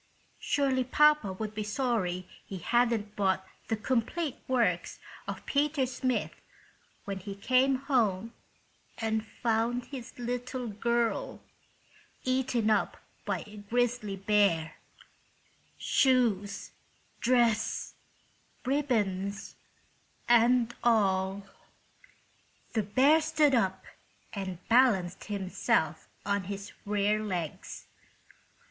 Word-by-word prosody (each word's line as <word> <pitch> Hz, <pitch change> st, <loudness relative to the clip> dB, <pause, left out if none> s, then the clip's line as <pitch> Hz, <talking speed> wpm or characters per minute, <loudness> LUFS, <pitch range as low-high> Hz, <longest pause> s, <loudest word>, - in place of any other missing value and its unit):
Surely 270 Hz, -3 st, +1 dB
papa 300 Hz, -3 st, +4 dB
would 215 Hz, +3 st, -5 dB
be 215 Hz, -, -3 dB
sorry 210 Hz, -5 st, -1 dB, 0.2 s
he 195 Hz, -, -7 dB
hadn't 220 Hz, +2 st, +1 dB
bought 190 Hz, -1 st, +1 dB, 0.2 s
the 220 Hz, -, 0 dB
"Complete 260 Hz, +7 st, -1 dB
Works 230 Hz, -9 st, +1 dB, 0.3 s
of -, -, -6 dB
Peter 290 Hz, -1 st, +1 dB
Smith" 255 Hz, 0 st, -1 dB, 0.7 s
when 195 Hz, -1 st, -4 dB
he 195 Hz, +1 st, -7 dB
came 255 Hz, +6 st, +3 dB
home 230 Hz, -6 st, 0 dB, 0.6 s
and 220 Hz, -1 st, -1 dB
found 235 Hz, +2 st, -1 dB
his 255 Hz, -3 st, -9 dB
little 245 Hz, +1 st, -3 dB
girl 235 Hz, +2 st, -1 dB, 0.8 s
eaten 255 Hz, -4 st, +1 dB
up 210 Hz, -, +1 dB, 0.3 s
by -, -, -2 dB
a 210 Hz, 0 st, -12 dB
grizzly 225 Hz, 0 st, -1 dB
bear—shoes, 200 Hz, -, -1 dB, 0.5 s
dress, 235 Hz, -3 st, +1 dB, 0.7 s
ribbons 205 Hz, -8 st, -1 dB, 0.7 s
and 240 Hz, 0 st, +4 dB
all! 195 Hz, -3 st, +2 dB, 1.3 s
The 220 Hz, -, +2 dB
bear 265 Hz, +10 st, +4 dB
stood 305 Hz, -2 st, +3 dB
up 190 Hz, -6 st, +1 dB, 0.5 s
and 190 Hz, -4 st, -6 dB
balanced 215 Hz, -8 st, +3 dB
himself 195 Hz, -3 st, -1 dB, 0.2 s
on 200 Hz, -2 st, 0 dB
his 200 Hz, +1 st, -6 dB, 0.2 s
rear 210 Hz, +1 st, +1 dB
legs. 180 Hz, -7 st, -5 dB
225 Hz, 90 wpm, -30 LUFS, 200-255 Hz, 1.3 s, papa